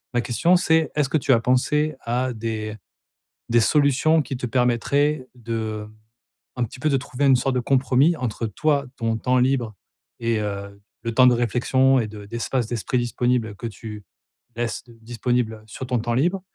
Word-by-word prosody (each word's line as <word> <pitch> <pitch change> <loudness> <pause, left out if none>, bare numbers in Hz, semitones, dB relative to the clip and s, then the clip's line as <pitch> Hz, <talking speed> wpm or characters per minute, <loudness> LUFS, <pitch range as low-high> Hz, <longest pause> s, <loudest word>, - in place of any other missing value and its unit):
La 120 - +3
question 165 +10 +2
c'est 160 -4 +3
est-ce 150 -3 +1
que 155 - +2
tu 135 - 0
as 120 - +5
pensé 145 +5 +1
à 125 +2 -1
des 110 -1 -4 0.7
des 120 0 +4
solutions 150 +5 +3
qui 135 - -5
te 125 0 -4
permettraient 130 +4 +1
d'un 110 -2 -4 0.7
petit 120 +2 -6
peu 155 - 0
de 140 - +2
trouver 140 +1 -2
une 135 -1 +6
sorte 130 +1 0
de - - +2
compromis 135 +5 +3
entre 120 -4 -3
toi, 140 +6 0
ton 115 -2 -1
temps 125 +3 +1
libre 125 -4 +1 0.4
et, 115 -1 0
heu, 100 -1 -5 0.2
le 115 - -2
temps 125 +2 +6
de 125 - +5
réflexion 130 +3 +2
et 115 - -1
de 105 -1 -10
d'espace 120 +3 -2
d'esprit 120 +2 -2
disponible 120 -2 0
que 115 - -5
tu 105 -1 -8 0.5
laisses 120 -1 -2 0.2
disponibles 115 -1 -1
sur 130 - -7
ton 125 -1 0
temps 120 +1 -1
libre? 175 +9 +1
125 Hz, 175 wpm, -23 LUFS, 115-135 Hz, 0.7 s, une